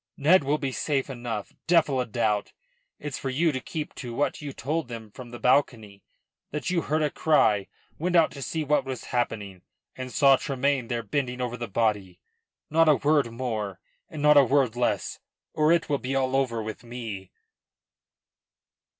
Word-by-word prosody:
"Ned 155 +4 +5
will 145 +2 +1
be 140 -3 -3
safe 135 0 -1
enough, 120 -5 -5
devil 155 -6 +3
a 125 - -3
doubt. 110 -2 0 0.4
It's 150 -3 -5
for 135 - -3
you 155 +5 +2
to 130 - -3
keep 155 +3 -5
to 120 -3 -6
what 145 - -1
you 145 -1 -5
told 150 +3 -2
them 115 -3 -8
from 125 +3 -10
the 120 - -8
balcony; 115 -6 +1 0.5
that 150 +4 -3
you 175 -2 +1
heard 155 +1 0
a 150 - 0
cry, 110 -11 +3 0.3
went 180 +3 0
out 165 -2 +5
to 140 - -9
see 160 +3 -2
what 150 0 +2
was 130 -3 -5
happening 105 -6 -2 0.3
and 130 -1 -6
saw 135 -1 +5
Tremayne 135 -2 0
there 120 -1 -2
bending 125 +2 -2
over 125 -1 -2
the 120 -1 -5
body. 100 -4 -1 0.5
Not 160 +1 +4
a 150 - +6
word 145 0 +2
more, 110 -6 -3 0.3
and 150 -2 -6
not 150 0 +7
a 140 - +9
word 130 -2 +2
less, 120 0 -1 0.3
or 155 +1 +3
it 170 -1 +3
will 145 -2 0
be 130 +1 -3
all 130 -1 +1
over 120 -5 0
with 110 +3 -7
me." 115 -6 -7
130 Hz, 185 wpm, -26 LUFS, 115-150 Hz, 0.5 s, a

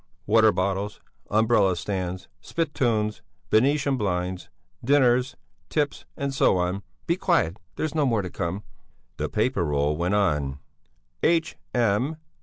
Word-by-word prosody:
"Water - - +5
bottles, 100 +2 -2 0.3
umbrella 105 -3 +3
stands, 90 0 -4
spittoons, 115 - -1 0.3
Venetian 140 +4 +3
blinds, 90 -3 -2 0.3
dinners, 130 -1 +3 0.3
tips 150 -2 -1
and 140 -1 -2
so 135 - +3
on. 90 +2 -1 0.2
Be 170 - +2
quiet, 90 - +1 0.2
there's 155 - -2
more 130 -9 +1
to 90 - -6
come!" 90 +5 -3 0.5
The - - -2
paper 110 -3 +1
roll 75 -1 +1
went 90 +5 0
on: 75 -9 +1 0.6
"H.M. 135 -5 +1
105 Hz, 115 wpm, -25 LUFS, 90-135 Hz, 0.6 s, Water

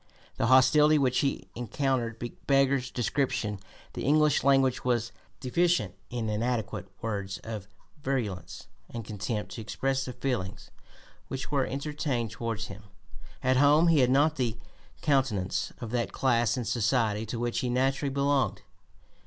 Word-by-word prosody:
The - - +1
hostility 150 +4 +6
which 130 -3 +2
he 135 -10 -1
encountered 120 0 -1 0.3
beggars 135 -2 +3
description; 120 -5 -1 0.3
the - - -5
English 150 +1 +3
language 135 -2 +3
was 120 -2 0 0.3
deficient 130 - +1 0.2
in 120 -2 -3
adequate 110 -5 -2 0.2
words 100 -4 -3
of 110 -3 -6 0.3
virulence 110 - -3 0.2
and 115 -2 -6
contempt 105 +1 -4
to 115 - -6
express 135 +4 -1
the 125 - -5
feelings 115 -9 -3 0.6
which 130 +1 -5
were 140 -3 +1
entertained 140 -4 -2
towards 115 -2 -3
him. 100 +1 -10 0.6
At 130 0 +3
home 150 +5 +5
he 160 -3 +5
had 125 -2 +4
not 145 +4 +3
the 120 -4 -1 0.5
countenance 130 - +1
of 115 -3 -6
that 120 -1 -1
class 120 -2 +2
in 125 - -2
society 110 -1 +1
to 115 - -4
which 120 0 -1
he 125 - -1
naturally 135 +3 +1
belonged. 140 -1 +1
125 Hz, 140 wpm, -28 LUFS, 115-135 Hz, 0.6 s, hostility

